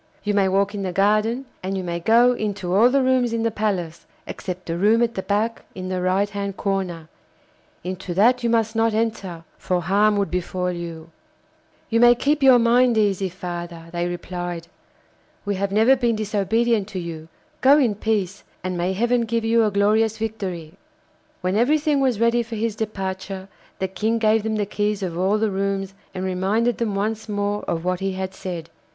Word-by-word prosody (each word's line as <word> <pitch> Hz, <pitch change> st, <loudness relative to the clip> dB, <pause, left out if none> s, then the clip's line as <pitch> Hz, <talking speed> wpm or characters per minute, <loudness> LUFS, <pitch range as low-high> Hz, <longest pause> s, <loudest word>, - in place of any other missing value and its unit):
You 205 Hz, -, 0 dB
may 200 Hz, -1 st, +3 dB
walk 200 Hz, +2 st, +1 dB
in 205 Hz, -, -4 dB
the 190 Hz, -2 st, -2 dB
garden, 215 Hz, +7 st, +1 dB, 0.2 s
and 190 Hz, +1 st, -3 dB
you 190 Hz, -, -3 dB
may 170 Hz, -1 st, -3 dB
go 235 Hz, +7 st, +5 dB
into 205 Hz, -6 st, -3 dB
all 220 Hz, +6 st, +6 dB
the 270 Hz, +1 st, +2 dB
rooms 255 Hz, -2 st, +2 dB
in 230 Hz, 0 st, -1 dB
the 230 Hz, -, +1 dB
palace, 190 Hz, -6 st, -3 dB, 0.2 s
except 180 Hz, -1 st, -6 dB
the 165 Hz, -, -3 dB
room 215 Hz, +6 st, +3 dB
at 235 Hz, 0 st, 0 dB
the 190 Hz, -, -3 dB
back 215 Hz, +4 st, -1 dB
in 185 Hz, 0 st, -5 dB
the 185 Hz, -1 st, -2 dB
right 185 Hz, +3 st, +2 dB
hand 200 Hz, -1 st, -5 dB
corner; 185 Hz, -5 st, -2 dB, 0.8 s
into 185 Hz, 0 st, -5 dB
that 245 Hz, +6 st, +4 dB
you 235 Hz, -, +1 dB
must 225 Hz, -1 st, +1 dB
not 225 Hz, -1 st, +2 dB
enter, 200 Hz, -7 st, -2 dB, 0.2 s
for 180 Hz, -1 st, -1 dB
harm 205 Hz, +4 st, +3 dB
would 200 Hz, -1 st, 0 dB
befall 180 Hz, 0 st, -2 dB
you.' 165 Hz, -2 st, -7 dB, 0.8 s
'You 230 Hz, -, +3 dB
may 240 Hz, 0 st, +7 dB
keep 290 Hz, +4 st, +1 dB
your 265 Hz, -2 st, +7 dB
mind 240 Hz, 0 st, +4 dB
easy, 195 Hz, -3 st, +1 dB
father,' 175 Hz, -2 st, -7 dB
they 175 Hz, 0 st, -1 dB
replied. 175 Hz, -1 st, -5 dB, 0.8 s
'We 205 Hz, -, 0 dB
have 200 Hz, -1 st, 0 dB
never 220 Hz, +6 st, +5 dB
been 240 Hz, -3 st, +1 dB
disobedient 215 Hz, +1 st, 0 dB
to 195 Hz, -3 st, -5 dB
you. 165 Hz, -2 st, -7 dB, 0.3 s
Go 275 Hz, +2 st, +7 dB
in 250 Hz, -8 st, +3 dB
peace, 205 Hz, -2 st, -2 dB, 0.2 s
and 185 Hz, 0 st, -2 dB
may 175 Hz, +2 st, -1 dB
heaven 240 Hz, +4 st, +1 dB
give 230 Hz, 0 st, -1 dB
you 230 Hz, 0 st, +4 dB
a -, -, +2 dB
glorious 210 Hz, +2 st, +2 dB
victory!' 195 Hz, -8 st, -4 dB, 0.7 s
When 185 Hz, +1 st, 0 dB
everything 290 Hz, +5 st, +2 dB
was 255 Hz, -5 st, +1 dB
ready 235 Hz, +1 st, +3 dB
for 230 Hz, 0 st, -6 dB
his 220 Hz, 0 st, -1 dB
departure, 190 Hz, -2 st, -4 dB, 0.3 s
the 190 Hz, -, -1 dB
King 220 Hz, +4 st, -1 dB
gave 220 Hz, 0 st, +3 dB
them 220 Hz, +1 st, -2 dB
the 210 Hz, -1 st, 0 dB
keys 205 Hz, 0 st, -1 dB
of 175 Hz, -3 st, -3 dB
all 190 Hz, +4 st, +2 dB
the 215 Hz, -1 st, 0 dB
rooms 195 Hz, 0 st, -2 dB, 0.2 s
and 185 Hz, 0 st, -3 dB
reminded 200 Hz, +6 st, 0 dB
them 220 Hz, -4 st, -1 dB
once 215 Hz, +2 st, -2 dB
more 205 Hz, 0 st, -1 dB
of 165 Hz, 0 st, -2 dB
what 180 Hz, 0 st, 0 dB
he 195 Hz, 0 st, -2 dB
had 190 Hz, 0 st, -4 dB
said. 175 Hz, -4 st, -6 dB
205 Hz, 195 wpm, -22 LUFS, 185-225 Hz, 0.8 s, may